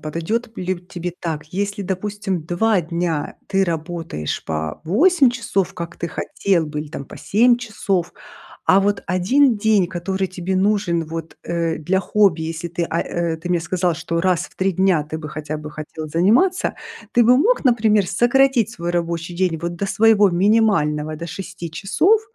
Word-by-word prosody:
Подойдет 170 +10 -3
лю 185 -1 -2
тебе 175 -1 -6
так? 160 -3 -3
Если, 200 +2 -2
допустим, 195 -1 -3
2 185 +5 +1
дня 170 -2 -2
ты 195 0 +1
работаешь 165 - -4
по 80 -1 -3
8 270 - +4
часов, 230 -6 -1
как 170 -1 -6
ты 170 - -4
хотел 170 0 0
бы, 150 0 -4
или 150 - -7
там 140 - -7
по - - -12
7 235 +4 +3
часов. 200 -6 -2 0.5
А 190 - +6
вот 200 +1 0
1 225 +8 +3
день, 205 -4 +3
который 190 +2 -2
тебе 185 +1 -3
нужен 190 -4 +1
вот, 165 0 -7
э, 170 -1 -1
для 180 +5 0
хобби, 195 -5 +2
если 165 +1 -4
ты, 170 0 -3
а, 165 0 -1
э, 170 -1 -2
ты 175 +2 -7
мне 175 -1 +2
сказал, 175 0 0
что 165 +1 -2
раз 180 -2 +2
в - - -19
3 190 +1 +1
дня 185 -3 +2
ты 155 +1 -6
бы 155 -1 -7
хотя 155 +1 -5
бы 150 0 -8
хотел 155 +1 -7
заниматься. 225 - +2 0.4
Ты 240 - +5
бы 245 +2 +6
мог, 475 - +2
например, 215 -4 +3
сократить 240 +3 +3
свой 175 -6 -4
рабочий 170 0 -2
день 180 -2 0
вот 170 +1 -4
до 195 +3 -3
своего 210 0 +4
минимального, 175 -6 +2
до 170 - -6
6 180 -2 -7
часов. 305 - +2
180 Hz, 175 wpm, -20 LUFS, 165-205 Hz, 0.5 s, А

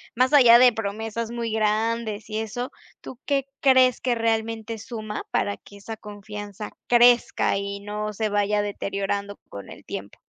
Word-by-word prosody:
más 255 +3 +2
allá 240 -5 +8
de 250 0 +7
promesas 225 +1 -4
muy 235 -1 -3
grandes, 220 0 -1
y 215 - -3
eso. 230 +3 -4 0.3
¿Tú 255 - -10
qué 275 -2 0
crees, 260 -2 +4
que 250 - +1
realmente 225 -1 -1
suma 215 -1 -6
para 200 - 0
que 200 - -16
esa 220 +2 -8
confianza 205 -1 -8 0.2
crezca, 240 -3 +4
y 200 0 -4
no 210 +1 -4
se 215 +1 -1
vaya 205 0 +1
deteriorando 200 0 -3
con 100 - -9
el - - -12
tiempo? - - -8
220 Hz, 155 wpm, -24 LUFS, 205-235 Hz, 0.3 s, allá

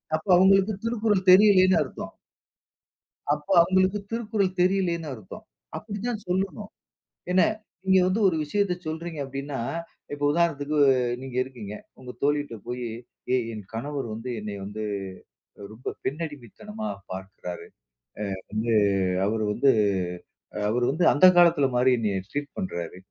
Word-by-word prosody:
அப்ப 160 +5 -6
அவுங்களுக்கு 195 +3 +5
திருக்குறள் 215 -4 0
தெரியலைன்னு 185 -2 +7
அர்த்தம். - - -6 1.2
அப்போ 150 +4 -5
அவுங்களுக்கு 185 +3 +2
திருக்குறள் 210 -5 -1
தெரியலைன்னு 180 -4 +1
அர்த்தம். 110 -6 -11 0.3
அப்படி 210 -1 -6
தான் 215 -4 -4
சொல்லணும். 195 +3 -2 0.6
என்ன, 185 +1 +5 0.4
நீங்க 190 0 +4
வந்து 185 +4 0
ஒரு 180 - +1
விஷயத்த 195 +5 0
சொல்றீங்க 160 0 -5
அப்படீன்னா, 135 +1 -5 0.5
இப்போ 145 0 -2
உதாரணத்துக்கு 155 -2 0 0.4
நீங்க 130 -2 -8
இருக்கீங்க. 120 -6 -9 0.3
உங்க 125 -1 -8
தோழிட்ட 145 -3 0
போயி, 125 0 -4 0.5
"ஏய் 125 -2 +1
என் 105 -1 -7
கணவர் 135 +2 -4
வந்து 115 +3 -6
என்னை 105 -1 -5
வந்து 105 +2 -6 0.8
அ - - -11
ரொம்ப 115 +4 -5
பெண்ணடிமைத்தனமா 160 - -6 0.2
பார்க்கிறாரு. 95 -1 -7 0.7
அ - - -6 0.2
வந்து 110 +2 0 0.5
அவரு 110 +1 0
வந்து 135 +6 +3 1.0
அவரு 120 +3 +1
வந்து 160 +6 0
அந்த 145 +5 +6
காலத்தில 170 -5 +5
மாரி 125 +1 +4
என்னைய 105 -4 -1
ட்ரீட் 145 0 -4
பண்றாரு. 90 - -4
150 Hz, 125 wpm, -25 LUFS, 125-190 Hz, 1.2 s, தெரியலைன்னு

